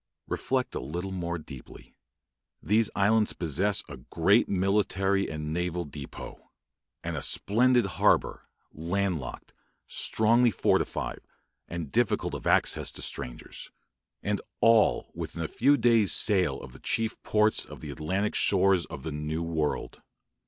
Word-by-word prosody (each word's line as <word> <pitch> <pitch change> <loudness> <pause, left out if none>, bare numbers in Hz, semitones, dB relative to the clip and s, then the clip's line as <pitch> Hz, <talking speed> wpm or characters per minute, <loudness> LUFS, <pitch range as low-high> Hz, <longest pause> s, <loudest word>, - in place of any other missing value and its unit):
Reflect - - -2
a - - -3
little 85 +9 -5
more 85 -2 -3
deeply. 75 -5 -12 0.7
These 110 +1 +2
islands 105 +2 +2
possess 95 +6 0
a 70 - -9
great 95 - +2
military 100 0 +1
and 75 -1 -5
naval 90 0 -2
depôt; 70 -1 -9 0.6
and - - -3
a - - -3
splendid 120 +3 +3
harbour, 100 - +1 0.2
landlocked, 85 -3 -3 0.3
strongly 115 +3 +3
fortified, 95 - -1 0.5
and 85 -4 -6
difficult 120 -3 0
of - - -5
access - - +2
to - - -5
strangers; - - -6 0.5
and 105 0 -1 0.2
all 115 -1 +3
within 85 0 -5
a - - -2
few 140 - +3
days' 115 - +3
sail 95 -4 +3
of 65 - -11
the 65 - -13
chief 115 0 -2
ports 105 0 +2
of - - -12
the 75 - -6
Atlantic 95 +9 -2
shores 95 -2 +3
of 65 - -9
the 80 - -4
New 75 +2 -3
World. 80 -3 -3
95 Hz, 135 wpm, -27 LUFS, 80-105 Hz, 0.7 s, splendid